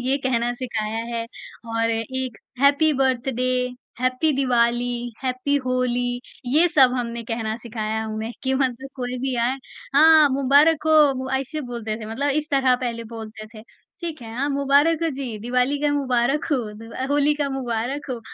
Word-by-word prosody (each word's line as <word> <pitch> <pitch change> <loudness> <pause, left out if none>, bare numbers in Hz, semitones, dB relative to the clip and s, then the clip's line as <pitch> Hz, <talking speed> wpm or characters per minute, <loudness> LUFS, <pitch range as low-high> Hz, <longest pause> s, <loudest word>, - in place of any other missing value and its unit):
ये 265 +2 +1
कहना 240 -2 +1
सिखाया 220 -3 -2 0.2
है, 230 0 -2 0.5
और 230 0 +1
एक 240 +2 -3 0.2
happy 285 +3 +4
birthday, 255 -1 +1 0.5
happy 255 +5 +1
Diwali, 240 -2 +1
happy 260 +2 0
Holi, 245 -1 0 0.3
ये 305 +8 +4
सब 270 -7 +5
हमने 235 -1 -3
कहना 225 -1 -3
सिखाया 220 -2 -4
है 220 - -2
उन्हें, 220 +2 -4
कि 265 0 0
मतलब 260 0 -1
कोई 250 -1 -3
भी 265 +1 -2
आए 235 +2 +2 0.4
"हाँ, 290 - +6
हाँ 315 -2 +7
मुबारक 285 +4 +4
हो।" 315 - +4 0.3
वो 260 0 -4
ऐसे 300 +4 -5
बोलते 225 -3 -4
थे 215 - -6
मतलब 280 +6 -1
इस 300 - -12
तरह 265 -2 +3
पहले 235 -2 -4
बोलते 220 -1 -8
थे, 215 - -10 0.4
"ठीक 330 -6 -5
है, 225 -1 -8
हाँ, 280 +3 0
मुबारक 285 +4 +3
हो 330 - +2
जी, 245 -6 -4
दिवाली 250 +5 0
का 295 -1 +2
मुबारक 270 0 +1
हो, - - +4 0.2
द 225 +2 -11
अ, 260 - -3
होली 290 +1 +3
का 280 - -1
मुबारक 250 +3 -3
हो।" 245 -2 -4
255 Hz, 175 wpm, -23 LUFS, 235-280 Hz, 0.5 s, हाँ